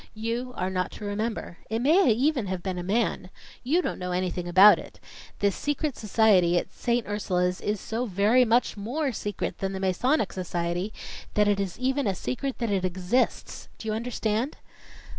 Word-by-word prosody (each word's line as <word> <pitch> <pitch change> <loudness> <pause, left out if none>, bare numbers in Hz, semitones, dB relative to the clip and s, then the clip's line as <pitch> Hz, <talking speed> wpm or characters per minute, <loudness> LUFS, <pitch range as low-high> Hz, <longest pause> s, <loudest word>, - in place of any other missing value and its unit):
You 230 +3 -3
are 185 +1 -1
not 185 -1 -1
to 210 - -8
remember. 205 -3 -3
It 220 - 0
may 300 +3 +4
even 255 0 +1
have 185 -1 -4
been 185 -2 -3
a - - -4
man. 200 -1 0 0.3
You 320 +8 +2
don't - - -3
know 180 0 -3
anything 180 -1 -2
about 190 +4 +8
it. - - -12 0.4
This 200 -2 +1
secret 290 -1 -2
society 200 -5 +3
at - - -3
Saint 240 -1 0
Ursula's 180 -3 -1
is 210 0 -1
so 235 +5 -3
very 210 +6 +4
much 240 +1 +2
more 260 +8 -2
secret 205 -2 -4
than 195 0 -2
the 190 - -4
Masonic 195 - +1
Society, 175 +1 -2 0.4
that 210 0 +4
it 205 -1 +2
is 195 -3 -3
even 265 0 0
a 195 - 0
secret 260 +6 -3
that 235 -3 -2
it 195 -2 0
exists. 185 +7 -1
Do 220 - -8
you 215 - 0
understand?" 230 +2 -2
210 Hz, 180 wpm, -26 LUFS, 185-245 Hz, 0.4 s, about